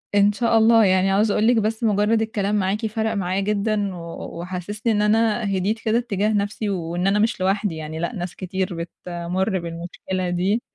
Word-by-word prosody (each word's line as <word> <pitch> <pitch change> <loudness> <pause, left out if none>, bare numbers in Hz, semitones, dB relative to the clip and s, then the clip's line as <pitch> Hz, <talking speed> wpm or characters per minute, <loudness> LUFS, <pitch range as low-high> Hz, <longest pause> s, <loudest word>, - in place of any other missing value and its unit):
إن 205 0 +5
شاء 230 +2 +2
الله، 225 0 +6
يعني 190 +1 +3
عاوزة 205 +1 +3
أقول 220 - +2
لِك 245 - +4
بس 220 +2 -1
مجرّد 215 +1 +2
الكلام 210 -2 -1
معاكِ 205 +3 0
فرق 220 +1 -1
معايا 190 -2 -1
جدًا 205 -1 0
و 170 0 -8
وحسِّسني 190 +5 -3
إن 210 - +1
أنا 220 +2 +2
هديت 205 +5 0
كده 225 +1 +1
اتّجاه 215 -3 0
نَفْسي 205 +1 -1
وإن 175 -1 -2
أنا 200 +1 +3
مش 220 -2 +1
لوحدي 195 -1 0
يعني 155 0 -6
لأ، 170 +7 -3
ناس 180 -2 -5
كتير 185 -1 -3
بتمُر 175 +3 -3
بالمشكلة 175 +2 -4
دي، 190 +6 0
200 Hz, 185 wpm, -22 LUFS, 185-220 Hz, -, الله